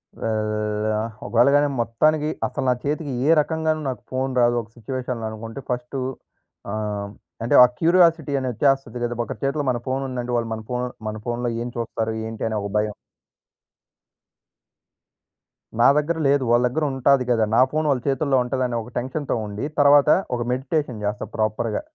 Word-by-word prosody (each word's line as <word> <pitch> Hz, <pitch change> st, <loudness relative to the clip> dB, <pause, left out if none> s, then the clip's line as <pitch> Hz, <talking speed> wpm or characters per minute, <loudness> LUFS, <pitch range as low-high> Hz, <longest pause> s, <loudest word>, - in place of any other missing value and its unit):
ఆహ్, -, -, -6 dB, 0.7 s
ఆహ్, 110 Hz, +1 st, -4 dB
ఒకవేళ 115 Hz, +5 st, +4 dB
గాని 145 Hz, 0 st, +4 dB
మొత్తానికి 150 Hz, +7 st, +2 dB, 0.2 s
అసలు 135 Hz, -, -4 dB
నా -, -, +5 dB
చేతికి 145 Hz, -1 st, -2 dB
ఏ -, -, +4 dB
రకంగాను 160 Hz, 0 st, -1 dB
నాకు 130 Hz, -, -5 dB
ఫోను 130 Hz, +1 st, -1 dB
రాదు. 120 Hz, 0 st, +4 dB
ఒక 115 Hz, -, -15 dB
సిట్యుయేషన్‌లో 125 Hz, 0 st, -4 dB
అనుకుంటే 115 Hz, +4 st, -7 dB
ఫస్టు 125 Hz, +2 st, -3 dB, 0.7 s
ఆహ్, 105 Hz, -2 st, -3 dB, 0.3 s
అంటే 115 Hz, -, +2 dB
ఆ -, -, +10 dB
క్యూరియాసిటీ 165 Hz, -3 st, +4 dB
అనేది 130 Hz, -2 st, -2 dB
ఒచ్చేస్తది 135 Hz, -1 st, +1 dB
గదా! 120 Hz, 0 st, -2 dB
ఒకరి -, -, -7 dB
చేతిలో 140 Hz, +2 st, 0 dB
మన 120 Hz, -, -2 dB
ఫోను 130 Hz, +1 st, -1 dB
ఉందంటే 125 Hz, -1 st, -4 dB
వాళ్ళు 115 Hz, -1 st, -2 dB
మన 110 Hz, 0 st, -6 dB
ఫోను 125 Hz, 0 st, -1 dB, 0.2 s
మన 110 Hz, -, -5 dB
ఫోనులో 120 Hz, 0 st, -2 dB
ఏం -, -, -4 dB
చూస్తారు? 115 Hz, -1 st, -2 dB
ఏంటి? 110 Hz, -1 st, -6 dB
అనే 110 Hz, -, -2 dB
ఒక 100 Hz, -, -4 dB
భయం. 105 Hz, 0 st, 0 dB, 2.9 s
నా 120 Hz, -, +7 dB
దగ్గర 155 Hz, +3 st, 0 dB
లేదు. 140 Hz, -1 st, +3 dB
వాళ్ళ 120 Hz, +1 st, +4 dB
దగ్గర 155 Hz, +6 st, -2 dB
ఉంటాది 135 Hz, 0 st, +3 dB
గదా! 115 Hz, -2 st, +3 dB
నా -, -, +6 dB
ఫోను 155 Hz, 0 st, 0 dB
వాళ్ళ 130 Hz, -3 st, 0 dB
చేతుల్లో 140 Hz, 0 st, +1 dB
ఉంటదని 125 Hz, -1 st, -1 dB
ఒక 120 Hz, +2 st, -12 dB
టెన్షన్‌తో 130 Hz, +2 st, -3 dB
ఉండి, 105 Hz, +5 st, -4 dB, 0.2 s
తరువాత 145 Hz, +1 st, +6 dB, 0.3 s
ఒక -, -, -4 dB
మెడిటేషన్ 130 Hz, -3 st, -2 dB
జేస్తా 105 Hz, +1 st, -3 dB
ప్రాపర్‌గా. 110 Hz, -, -1 dB
125 Hz, 165 wpm, -23 LUFS, 115-140 Hz, 2.9 s, ఆ